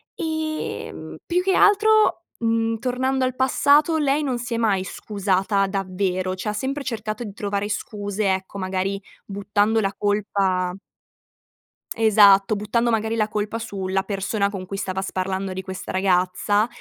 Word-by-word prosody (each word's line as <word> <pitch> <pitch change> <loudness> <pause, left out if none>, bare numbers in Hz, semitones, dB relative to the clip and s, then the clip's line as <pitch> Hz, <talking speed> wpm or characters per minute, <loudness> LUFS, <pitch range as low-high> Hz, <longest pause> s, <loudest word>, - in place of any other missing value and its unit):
Ehm, 315 -1 -4
più 360 +1 0
che 385 - +2
altro, 415 -2 +4
mhmm, 225 0 0
tornando 260 +2 0
al 255 0 -2
passato, 290 +4 +3
lei 290 +1 +1
non 255 -3 -1
si 240 0 -3
è - - -1
mai 205 -5 +1
scusata 195 0 0
davvero, 185 -1 -2
cioè 200 +3 -4
ha - - -2
sempre 270 +6 -3
cercato 220 -1 -4
di 205 -3 -7
trovare 205 0 -2
scuse, 205 -2 -2
ecco, 190 +1 -5
magari 190 +1 -2 0.3
buttando 205 +2 +1
la 195 0 -1
colpa 195 -3 0 1.2
esatto, 205 -2 +6
buttando 230 +3 0
magari 220 0 0
la 215 -1 0
colpa 210 +1 -2
su 200 -5 -5
la 190 0 0
persona 200 +1 -1
con 195 -2 -6
cui 195 - -6
stava 190 -1 -2
sparlando 190 0 -3
di 190 - -4
questa 190 -1 -7
ragazza. 190 +3 +2
205 Hz, 150 wpm, -23 LUFS, 195-235 Hz, 1.2 s, esatto